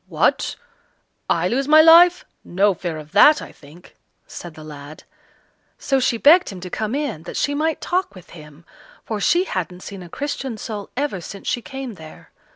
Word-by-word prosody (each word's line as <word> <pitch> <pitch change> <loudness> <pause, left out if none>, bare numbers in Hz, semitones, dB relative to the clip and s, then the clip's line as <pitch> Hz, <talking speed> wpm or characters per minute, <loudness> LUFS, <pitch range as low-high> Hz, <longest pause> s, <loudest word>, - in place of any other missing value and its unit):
"What! - - 0 0.7
I - - +1
lose 270 +3 -1
my 310 +1 +7
life! 345 +2 +6 0.2
No 195 +3 +1
fear 170 -2 -5
of 155 0 -11
that, 300 0 +6
I - - -10
think," 155 +5 -18 0.3
said 170 -3 -10
the 155 - -11
lad. 150 0 -11 0.7
So 270 -1 0
she 245 -2 0
begged 330 +9 +5
him 190 - -8
to 180 0 -8
come 220 +3 -3
in, 280 - -3
that - - -8
she 285 - 0
might 310 +2 -1
talk 370 - -2
with 185 - -15
him, 150 0 -14 0.4
for 215 -2 -4
she 345 - +3
hadn't 180 - -5
seen 195 -1 -9
a 175 - -11
Christian 270 - -5
soul 210 -2 -7
ever 275 -10 -2
since 200 +2 -10
she 240 - -1
came 265 -2 -7
there. 160 -4 -14
215 Hz, 185 wpm, -21 LUFS, 175-290 Hz, 0.7 s, my